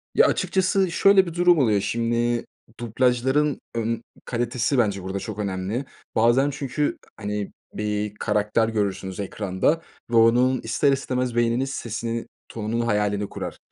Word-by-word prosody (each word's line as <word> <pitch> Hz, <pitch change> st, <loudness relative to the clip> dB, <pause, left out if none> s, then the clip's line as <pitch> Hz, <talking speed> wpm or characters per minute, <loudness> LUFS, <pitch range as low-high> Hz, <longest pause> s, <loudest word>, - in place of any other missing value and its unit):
Ya, -, -, +6 dB
açıkçası 190 Hz, -1 st, +1 dB
şöyle 195 Hz, +2 st, +5 dB
bir 170 Hz, -, -6 dB
durum 175 Hz, 0 st, +4 dB
oluyor, 105 Hz, -6 st, +3 dB
şimdi 120 Hz, +1 st, 0 dB, 0.3 s
dublajların, 130 Hz, +5 st, +1 dB, 0.2 s
ımm, 115 Hz, +1 st, -1 dB, 0.2 s
kalitesi 120 Hz, +2 st, -1 dB
bence 100 Hz, -5 st, +1 dB
burada 95 Hz, +1 st, -3 dB
çok 105 Hz, +1 st, -6 dB
önemli 100 Hz, +6 st, -2 dB, 0.3 s
bazen 120 Hz, +5 st, +4 dB
çünkü, 140 Hz, +1 st, -2 dB, 0.2 s
hani, 105 Hz, -1 st, -3 dB, 0.2 s
bir 105 Hz, 0 st, -2 dB
karakter 105 Hz, +2 st, +1 dB
görürsünüz 95 Hz, -3 st, -2 dB
ekranda 100 Hz, -, 0 dB, 0.3 s
ve 120 Hz, -, -1 dB
onun 120 Hz, +3 st, +4 dB
ister 130 Hz, +5 st, +2 dB
istemez 125 Hz, -2 st, -1 dB
beyniniz 120 Hz, +3 st, +1 dB
sesini, 115 Hz, -2 st, -4 dB, 0.2 s
tonunun 115 Hz, +1 st, -2 dB
hayalini 105 Hz, -2 st, 0 dB
kurar -, -, -6 dB
115 Hz, 130 wpm, -24 LUFS, 105-130 Hz, 0.3 s, Ya